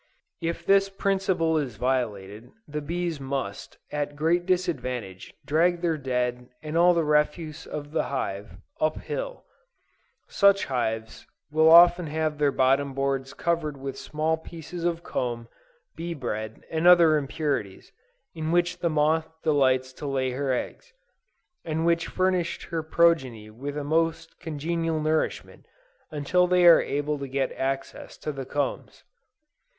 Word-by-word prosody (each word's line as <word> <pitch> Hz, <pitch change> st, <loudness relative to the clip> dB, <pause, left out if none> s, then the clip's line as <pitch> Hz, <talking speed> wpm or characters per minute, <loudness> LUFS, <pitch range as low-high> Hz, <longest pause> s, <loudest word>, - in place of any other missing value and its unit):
If 165 Hz, 0 st, -3 dB
this 195 Hz, 0 st, +4 dB
principle 190 Hz, -5 st, 0 dB
is 130 Hz, -7 st, -4 dB
violated, 110 Hz, -3 st, -2 dB, 0.2 s
the 150 Hz, +1 st, -4 dB
bees 170 Hz, +1 st, -3 dB
must, 135 Hz, -7 st, -5 dB
at 145 Hz, 0 st, -3 dB
great 170 Hz, +4 st, +1 dB
disadvantage, 125 Hz, -, -2 dB
drag 170 Hz, +3 st, +2 dB
their 170 Hz, -2 st, +1 dB
dead, 125 Hz, -2 st, -2 dB
and 155 Hz, +1 st, -5 dB
all 175 Hz, +1 st, +5 dB
the 165 Hz, -, +2 dB
refuse 150 Hz, +1 st, 0 dB
of 145 Hz, -1 st, -6 dB
the 160 Hz, -, 0 dB
hive, 100 Hz, -8 st, -4 dB, 0.2 s
up 155 Hz, 0 st, +1 dB
hill. -, -, -5 dB, 0.8 s
Such 200 Hz, -1 st, +4 dB
hives 115 Hz, -4 st, -3 dB, 0.2 s
will 160 Hz, +1 st, +5 dB
often 175 Hz, +1 st, +7 dB
have 155 Hz, 0 st, -2 dB
their 145 Hz, -1 st, +3 dB
bottom 135 Hz, +1 st, +2 dB
boards 135 Hz, -1 st, -2 dB
covered 165 Hz, -4 st, -1 dB
with 135 Hz, 0 st, -6 dB
small 155 Hz, +1 st, -1 dB
pieces 165 Hz, +1 st, -8 dB
of 170 Hz, -1 st, -1 dB
comb, 120 Hz, -6 st, -3 dB, 0.5 s
bee 170 Hz, 0 st, -5 dB
bread, 110 Hz, -5 st, -5 dB
and 160 Hz, +2 st, +1 dB
other 170 Hz, -3 st, +7 dB
impurities, 140 Hz, -8 st, -3 dB, 0.4 s
in 160 Hz, 0 st, -3 dB
which 175 Hz, +1 st, +1 dB
the 170 Hz, -, 0 dB
moth 155 Hz, +1 st, +1 dB
delights 130 Hz, -4 st, +2 dB
to 145 Hz, -, -7 dB
lay 130 Hz, -2 st, 0 dB
her 135 Hz, +1 st, -1 dB
eggs; 470 Hz, -, -4 dB, 0.7 s
and 160 Hz, 0 st, -2 dB
which 170 Hz, 0 st, +2 dB
furnished 185 Hz, -2 st, 0 dB
her 165 Hz, -1 st, -3 dB
progeny 155 Hz, -10 st, +1 dB
with 140 Hz, +6 st, -6 dB
a 145 Hz, -, -3 dB
most 165 Hz, +2 st, -1 dB
congenial 165 Hz, 0 st, -2 dB
nourishment, 155 Hz, +1 st, -2 dB, 0.4 s
until 155 Hz, +5 st, +1 dB
they 180 Hz, 0 st, +4 dB
are 170 Hz, -1 st, +8 dB
able 145 Hz, +1 st, -2 dB
to 140 Hz, -, -5 dB
get 135 Hz, 0 st, -1 dB
access 135 Hz, +1 st, -4 dB
to 155 Hz, -, -4 dB
the 135 Hz, -2 st, -6 dB
combs. 145 Hz, +1 st, -3 dB
150 Hz, 145 wpm, -26 LUFS, 135-170 Hz, 0.8 s, are